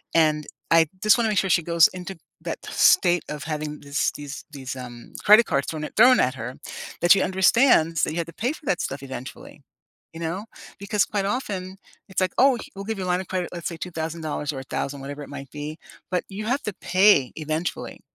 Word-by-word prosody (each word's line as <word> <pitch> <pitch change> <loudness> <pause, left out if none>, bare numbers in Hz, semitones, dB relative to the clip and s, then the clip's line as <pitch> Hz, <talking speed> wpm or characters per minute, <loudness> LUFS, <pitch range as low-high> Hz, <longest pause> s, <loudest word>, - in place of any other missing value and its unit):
And 155 -2 +3 0.2
I 165 -1 +6 0.2
just 215 +2 +6
wanna 230 -2 +1
make 210 - 0
sure 190 - 0
she 170 - +4
goes 170 -1 +5
into 185 0 -8 0.2
that - - -5
state 175 -3 +4
of 150 -1 -5
having 150 -1 -4
this 140 0 0
these 145 0 -8
these, 135 -3 -6
um, 120 -2 -10
credit 215 +3 +8
cards 140 -6 0
thrown 155 -1 -4
at - - -7
thrown 250 +3 +7
at 130 +2 +1
her, 125 +2 -6 0.5
that 175 +1 +4
she 195 - +7
understands 190 - +4
that - - +2
you 160 - -5
had 170 -1 -2
to 170 - -11
pay 240 - -1
for 315 - -14
that 180 - 0
stuff 135 0 -4
eventually, 130 -1 -9 0.5
you 165 - -9
know? 175 +6 -3 0.3
Because 200 +1 +1
quite 200 -2 -2
often, 195 -5 -3 0.3
it's 190 - -1
like, 185 -1 +1
oh, 265 -1 +5
he - - -12
we'll 195 0 -7
give 225 -1 -3
you - - -2
a - - -4
line 180 0 +1
of 190 - -10
credit, 185 -2 -2
let's 170 -1 -4
say, 170 - -7
$2,000 160 -3 -4
or 135 - -5
1,000 135 +1 -4
whatever 140 +2 -7
it - - -11
might 140 -1 -8
be, 150 +1 -6 0.3
but 180 - 0
you 205 +2 -6
have 250 +5 0
to 210 - -3
pay 185 -7 +4
eventually. 155 +2 -3
170 Hz, 220 wpm, -24 LUFS, 150-195 Hz, 0.5 s, credit